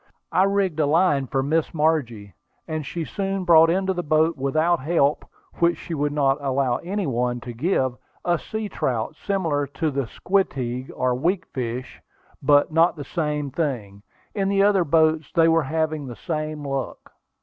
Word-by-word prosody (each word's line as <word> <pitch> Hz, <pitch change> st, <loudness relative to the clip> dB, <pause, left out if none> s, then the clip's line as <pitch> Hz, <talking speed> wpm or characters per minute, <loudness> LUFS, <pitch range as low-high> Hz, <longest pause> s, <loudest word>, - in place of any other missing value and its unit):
I 190 Hz, -, +4 dB
rigged 195 Hz, -5 st, 0 dB
a 150 Hz, -, +3 dB
line 150 Hz, -4 st, +2 dB
for 135 Hz, +2 st, 0 dB
Miss 160 Hz, +3 st, 0 dB
Margie, 125 Hz, -, 0 dB, 0.3 s
and 155 Hz, -1 st, -3 dB
she 165 Hz, +1 st, -4 dB
soon 195 Hz, 0 st, -3 dB
brought 165 Hz, -2 st, +7 dB
into 190 Hz, +2 st, +1 dB
the 175 Hz, -, -2 dB
boat 155 Hz, +1 st, +2 dB
without 155 Hz, +6 st, +1 dB
help, 145 Hz, 0 st, +1 dB, 0.4 s
which 170 Hz, 0 st, +3 dB
she 170 Hz, -, -7 dB
would 145 Hz, -1 st, 0 dB
not 140 Hz, -1 st, +1 dB
allow 135 Hz, -2 st, +1 dB
any 195 Hz, +3 st, -3 dB
one 125 Hz, -2 st, -1 dB
to 120 Hz, -, -7 dB
give, 130 Hz, -1 st, 0 dB, 0.3 s
a 175 Hz, -2 st, +2 dB
sea 220 Hz, -1 st, -4 dB
trout, 125 Hz, -, -2 dB
similar 160 Hz, -7 st, -1 dB
to 155 Hz, +3 st, -2 dB
the 135 Hz, -3 st, -2 dB
squeteague 130 Hz, -, -1 dB
or 130 Hz, 0 st, +1 dB
weakfish, 130 Hz, -5 st, -3 dB, 0.4 s
but 145 Hz, +1 st, +4 dB
not 165 Hz, +3 st, +3 dB
the 150 Hz, -, -6 dB
same 150 Hz, -4 st, -2 dB
thing. 125 Hz, -10 st, -3 dB, 0.3 s
In 195 Hz, -2 st, 0 dB
the 195 Hz, 0 st, +3 dB
other 200 Hz, -3 st, +4 dB
boats 160 Hz, -1 st, +2 dB
they 165 Hz, -2 st, +4 dB
were 165 Hz, 0 st, +4 dB
having 155 Hz, 0 st, -2 dB
the 120 Hz, -, -7 dB
same 155 Hz, -1 st, -4 dB
luck. 135 Hz, -1 st, -5 dB
155 Hz, 170 wpm, -23 LUFS, 135-170 Hz, 0.4 s, brought